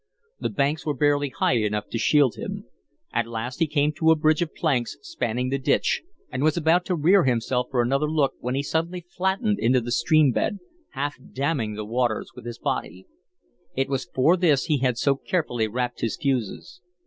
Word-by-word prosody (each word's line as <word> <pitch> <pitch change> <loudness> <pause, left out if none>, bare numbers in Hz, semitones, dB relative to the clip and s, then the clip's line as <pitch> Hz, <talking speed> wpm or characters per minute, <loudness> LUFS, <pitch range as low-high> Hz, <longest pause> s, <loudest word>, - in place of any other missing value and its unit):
The - - -1
banks 150 -4 0
were 150 -2 -1
barely 145 +1 +2
high 130 - +1
enough 105 -1 -1
to 115 - -3
shield 135 +1 +4
him. - - -6 0.5
At - - 0
last 120 +4 -5
he 165 - +3
came 150 0 +1
to 160 +2 +2
a 160 - +7
bridge 155 0 +2
of 170 - -3
planks 130 -8 0
spanning 125 - -2
the 135 +1 -1
ditch 130 - +1 0.3
and - - -3
was 155 +2 +2
about 170 +2 +3
to 180 - 0
rear 175 +5 +4
himself 125 0 0
for 125 -2 +1
another 135 +5 +1
look 150 -3 +1
when 125 +2 -2
he 140 - 0
suddenly 165 +4 -2
flattened 195 +3 0
into 125 +2 +3
the 120 0 -5
stream 150 +3 +4
bed, 205 - -1 0.4
half 145 +1 -3
damming 135 -6 -1
the 105 0 -5
waters 120 0 -1
with 120 -1 -10
his 120 -1 -6
body. 90 +3 -3 0.7
It 135 0 0
was 135 -2 -1
for 145 +7 +4
this 160 -7 +3
he 150 -3 +1
had 125 -2 +1
so 140 +2 +2
carefully 120 -10 -1
wrapped 125 +2 -3
his 115 - -1
fuses. 135 - -2
140 Hz, 195 wpm, -24 LUFS, 120-155 Hz, 0.7 s, a